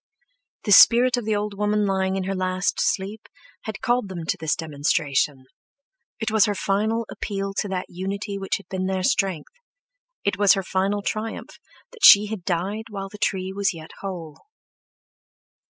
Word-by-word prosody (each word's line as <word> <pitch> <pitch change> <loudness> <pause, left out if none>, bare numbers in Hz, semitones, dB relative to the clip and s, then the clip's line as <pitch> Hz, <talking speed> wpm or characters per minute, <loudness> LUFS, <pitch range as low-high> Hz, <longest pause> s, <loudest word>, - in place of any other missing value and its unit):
The 205 - -2
spirit 245 +5 +7
of 245 -3 -4
the 215 -1 +1
old 205 0 -2
woman 210 +1 +1
lying 190 -1 0
in 190 - -2
her 195 +1 -2
last 185 0 -1
sleep 205 +3 -2 0.4
had 215 -3 -6
called 240 -3 0
them 170 -3 -6
to 200 - 0
this 160 -1 0
demonstration. 145 -3 -1 0.7
It 220 -1 -2
was 220 -3 +4
her 205 - -1
final 215 +5 0
appeal 195 -1 -4
to - - -1
that 185 -2 -3
unity 200 +2 -5
which 195 - -1
had 200 - -16
been 185 0 -3
their 190 -1 -1
strength—it - - -4
was 205 -2 +6
her 195 - -1
final 195 +2 -1
triumph 220 +2 -5 0.3
that 465 -4 -14
she 205 - +9
had 210 -3 -6
died 195 +5 -2
while 195 -2 -6
the 210 - -12
tree 190 -2 -1
was 200 -2 0
yet 160 -1 -10
whole. 175 -6 -7
195 Hz, 170 wpm, -23 LUFS, 185-210 Hz, 0.7 s, she